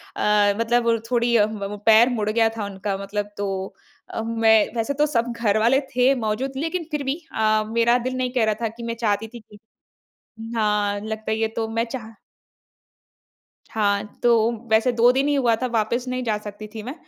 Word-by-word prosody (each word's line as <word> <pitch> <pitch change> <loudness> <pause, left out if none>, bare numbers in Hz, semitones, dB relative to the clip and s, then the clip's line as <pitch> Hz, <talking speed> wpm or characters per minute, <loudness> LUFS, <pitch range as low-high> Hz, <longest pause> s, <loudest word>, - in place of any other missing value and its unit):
अ, 205 -1 +3
मतलब 230 0 +2
थोड़ी 235 -1 +2
अ, 205 - +5
म 215 -2 -6
वो 210 - -6
पैर 225 +2 +6
मुड़ 210 -1 -1
गया 225 +1 +3
था 210 - -3
उनका 195 0 -4
मतलब 205 +1 -3
तो 200 0 -2 0.6
अ, - - -4
मैं 225 0 +3 0.2
वैसे 230 +4 -1
तो 295 +2 +2
सब 235 +1 +1
घरवाले 230 +3 +3 0.2
थे 255 +2 +4
मौजूद। 245 +6 -2
लेकिन 330 +3 -3
फिर 300 -1 -2
भी 270 +1 -1 0.2
अ, 215 0 +2
मेरा 235 +1 +4
दिल 255 - -5
नहीं 255 -1 -1
कह 245 -4 +2
रहा - - -2
था 230 - +1
कि 235 - -8
मैं - - -4
चाहती 210 +1 0
थी 240 +2 -11
कि 210 -1 -18 1.0
हाँ, 210 -2 +1
लगता 220 +1 -5
ही 220 - -1
है। 220 - +2
तो 225 -1 -1
मैं 230 +1 -1
चाह 230 -2 -7 1.6
हाँ, 200 -2 +1 0.2
तो 235 -1 +4 0.2
वैसे 225 +3 +4
2 240 +1 +4
दिन 270 +2 +1
ही 290 - +2
हुआ 245 -5 +3
था, 255 - 0
वापस 235 +1 -1
नहीं 255 0 -2
जा 220 -3 0
सकती 210 0 -9
थी 220 - -6
मैं। 255 +4 -5
225 Hz, 200 wpm, -23 LUFS, 215-240 Hz, 1.6 s, पैर